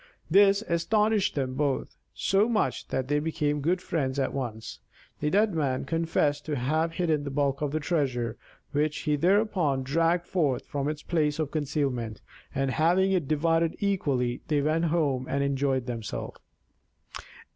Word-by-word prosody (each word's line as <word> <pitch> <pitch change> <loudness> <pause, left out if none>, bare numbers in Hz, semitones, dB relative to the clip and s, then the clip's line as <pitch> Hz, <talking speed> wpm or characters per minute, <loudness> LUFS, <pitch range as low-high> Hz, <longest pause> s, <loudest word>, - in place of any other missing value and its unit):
This 200 +2 +5
astonished 210 +3 +1
them 130 -3 -1
both 140 0 -1 0.2
so 200 +4 +2
much 220 -3 0
that 130 -1 -2
they 145 +1 +2
became 150 -1 -1
good 180 +5 0
friends 140 -5 -1
at 135 -2 0
once. 115 -5 -5 0.4
The 150 - 0
Deaf 210 +6 +3
Man 140 -8 -1
confessed 155 -2 0
to 150 - -1
have 155 +6 0
hidden 160 -5 0
the 145 - -4
bulk 140 0 0
of 150 - 0
the 155 - -1
treasure, 130 -8 -1 0.4
which 150 +1 0
he 150 -1 +1
thereupon 175 -5 +2
dragged 165 +5 +1
forth 150 -10 0
from 145 -1 -3
its 150 0 -5
place 150 -3 0
of 155 -3 -2
concealment, 135 -7 -2 0.4
and 135 0 0
having 180 +6 +3
divided 165 +3 +1
it - - -16
equally, 140 -11 0
they 145 -2 +1
went 160 +3 +1
home 145 -6 0
and 140 0 0
enjoyed 135 -2 0
themselves. 115 -3 -5
150 Hz, 155 wpm, -27 LUFS, 135-170 Hz, 0.4 s, This